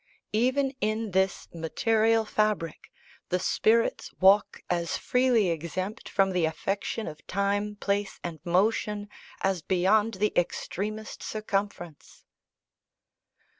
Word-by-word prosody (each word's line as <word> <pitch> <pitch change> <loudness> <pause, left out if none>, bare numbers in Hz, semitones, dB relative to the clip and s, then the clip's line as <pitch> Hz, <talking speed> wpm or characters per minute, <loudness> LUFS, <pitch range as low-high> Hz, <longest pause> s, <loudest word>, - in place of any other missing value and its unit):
"Even 260 +5 +2
in 215 0 -1
this 190 +1 +1
material 220 +7 +2
fabric, 210 -7 -1 0.4
the 180 - +2
spirits 225 +5 +1
walk 195 +2 +4
as 170 -1 -1
freely 250 -6 +2
exempt 185 +6 -4
from 195 -1 +2
the 180 -2 +1
affection 195 +7 -2
of 155 -1 -9
time, 205 +2 0
place 200 -1 -2
and 170 -2 -5
motion, 205 +3 +1 0.3
as 190 -3 +1
beyond 200 +6 +2
the 210 +2 0
extremest 210 +4 -2
circumference." 200 -6 -4
200 Hz, 105 wpm, -28 LUFS, 180-215 Hz, 0.4 s, walk